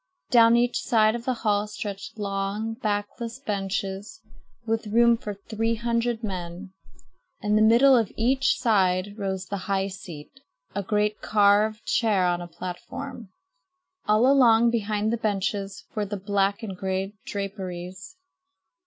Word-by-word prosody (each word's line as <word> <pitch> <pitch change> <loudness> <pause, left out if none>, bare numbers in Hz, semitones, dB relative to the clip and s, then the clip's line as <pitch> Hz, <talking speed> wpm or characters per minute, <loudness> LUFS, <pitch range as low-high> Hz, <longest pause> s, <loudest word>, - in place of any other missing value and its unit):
Down 230 -1 +7
each 245 +1 +1
side 220 -2 +3
of 235 0 -5
the 255 - 0
hall 205 0 +2
stretched 200 -1 -7
long, 200 +2 -2
backless 225 +1 -3
benches, 195 -3 -4 0.5
with 225 -1 -1
room 235 +2 +5
for 210 -3 -6
three 225 +3 -2
hundred 235 0 -1
men. 185 -1 -6 0.7
In 210 0 +1
the 215 - +4
middle 240 +5 +6
of 225 -5 +1
each 265 +4 +2
side 195 -4 +2
rose 190 -2 -3
the 200 - -4
high 195 0 +1
seat, 185 - -10 0.3
a 200 - -1
great 210 +1 0
carved 210 +1 +3
chair 210 -6 +2
on 175 0 0
a 175 - -6
platform. 225 +7 -7 0.8
All 215 +3 +4
along 235 -4 +5
behind 215 -1 0
the - - 0
benches 200 -2 -2
were 210 -1 -1
the 205 +1 -4
black 200 +1 0
and 195 -4 -5
gray 190 +1 -3
draperies. 190 - -6
210 Hz, 140 wpm, -25 LUFS, 195-230 Hz, 0.8 s, Down